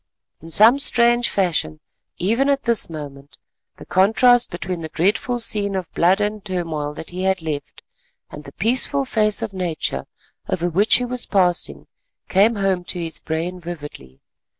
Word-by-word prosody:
In 165 - -11
some 225 - +6
strange 240 -2 +3
fashion, 165 - -1 0.4
even 230 +9 +1
at 280 -1 +1
this 235 -6 +3
moment, 145 -3 -9 0.4
the - - -13
contrast 225 +7 +3
between 175 0 -5
the 160 - -6
dreadful 210 +9 0
scene 205 -3 0
of 185 -3 -5
blood 185 +4 +3
and 210 0 -2
turmoil 165 -6 -4
that 160 - -8
he 180 +1 -5
had 190 -3 0
left, 145 -3 -6 0.5
and 150 - -9
the 140 - -11
peaceful 260 +6 +1
face 215 -4 +1
of 205 - -5
Nature 180 -4 -3 0.4
over 175 0 -1
which 200 +6 +3
he 250 - +1
was 245 0 -1
passing, 175 - +1 0.4
came 210 +5 +3
home 195 -3 0
to 180 - -1
his 165 -1 -3
brain 170 +3 -4
vividly. 150 - -10
185 Hz, 160 wpm, -20 LUFS, 165-220 Hz, 0.5 s, some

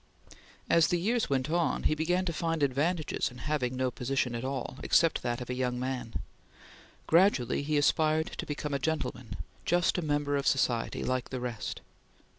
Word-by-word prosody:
As 165 -2 +5
the 175 - +1
years 225 +6 +1
went 130 -2 +1
on, 170 0 +1
he - - +3
began 175 +4 +1
to 170 - -1
find 165 -1 -1
advantages 150 +4 0
in 125 - -13
having 130 -3 -1
no 130 -1 0
position 125 0 -1
at 115 +1 -3
all 130 0 -4
except 165 -1 +3
that 120 0 -2
of 125 - -7
young 125 -1 -1
man. 125 -2 -4 0.9
Gradually 165 - +3
he 150 +1 0
aspired 155 +2 +2
to - - -3
become 145 0 -3
a 140 - 0
gentleman; 130 -7 -2 0.3
just 175 +1 +2
a - - -1
member 145 -2 0
of 140 - -1
society 120 -4 +1
like 130 -1 -1
the 130 - -4
rest. 120 -4 -4
140 Hz, 175 wpm, -30 LUFS, 125-160 Hz, 0.9 s, As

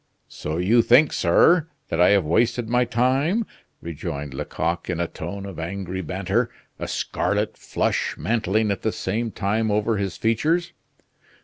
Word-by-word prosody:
"So 75 +2 -4
you 105 +7 +4
think, 130 +6 +5
sir, 160 - +4 0.2
that 80 - 0
I 90 - +6
have 100 -4 +4
wasted 115 +8 +1
my 125 +2 +2
time!" 135 - +1 0.4
rejoined 75 -3 -5
Lecoq 85 +6 -3
in 90 -2 -2
a 85 - 0
tone 95 +6 -6
of 95 -4 -8
angry 95 +2 -4
banter, 95 +7 -1 0.3
a - - -4
scarlet - - -1
flush - - -1
mantling 110 -2 0
at 100 - -3
the 110 - 0
same 110 +5 -2
time 110 +2 -1
over 105 +1 +1
his 95 -3 -3
features. 155 +10 +1
105 Hz, 150 wpm, -23 LUFS, 90-120 Hz, 0.4 s, I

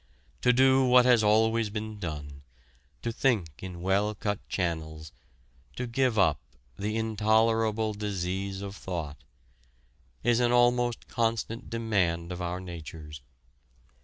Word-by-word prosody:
To 125 - +5
do 130 +1 +5
what 125 -1 +6
has 125 -3 +5
always 110 +1 +3
been 110 0 -5
done, 75 -5 -6 0.6
to 115 - -1
think 105 - 0
in 90 -2 -7
well 100 +3 +1
cut 105 -1 -2
channels, 80 -4 -3 0.6
to - - -3
give 120 -1 0
up 80 -7 +3 0.4
"the 105 +2 -2
intolerable 110 0 +1
disease 100 -1 -3
of 100 0 -6
thought," 80 -7 -6 1.0
is 120 -1 +3
an 120 -1 +2
almost 120 0 +2
constant 115 0 -2
demand 95 -7 0
of 90 0 -5
our 90 +1 -3
natures. 80 -4 -9
105 Hz, 125 wpm, -28 LUFS, 90-115 Hz, 1.0 s, what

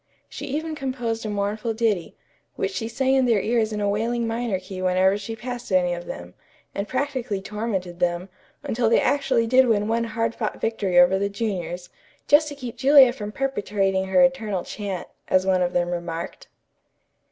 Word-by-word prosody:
She - - -7
even 310 +3 -3
composed 245 -6 -3
a - - -3
mournful 210 +2 -2
ditty, 215 -6 0 0.4
which 190 - -1
she 205 +4 -3
sang 265 +3 +1
in 265 -1 +4
their 225 -4 +3
ears 225 +1 +1
in 210 - -3
a 205 - 0
wailing 230 +4 0
minor 225 -3 -1
key 185 0 -8
whenever 185 +1 +3
she 210 +2 -5
passed 245 -1 -6
any 180 -1 +3
of 175 0 -6
them, 90 +1 -7 0.4
and 200 +1 -3
practically 255 -6 -2
tormented 195 -4 -4
them, 175 +1 0 0.4
until 230 0 0
they 230 - +5
actually 265 -5 +2
did 255 +2 +5
win 210 -2 +2
one 230 +1 +1
hard 230 0 -1
fought - - -4
victory 200 -5 0
over 180 +2 +5
the 200 0 0
juniors, 180 -5 -4 0.4
"just 300 +1 +5
to 290 - -6
keep 250 -3 -7
Julia 265 0 +7
from 210 -4 -6
perpetrating 205 -7 0
her 270 +8 +4
eternal 220 -8 +1
chant," 200 -4 -5 0.2
as 185 0 +3
one 185 -1 +2
of 175 0 +1
them 175 -1 0
remarked. 170 -1 -5
215 Hz, 185 wpm, -24 LUFS, 190-240 Hz, 0.4 s, Julia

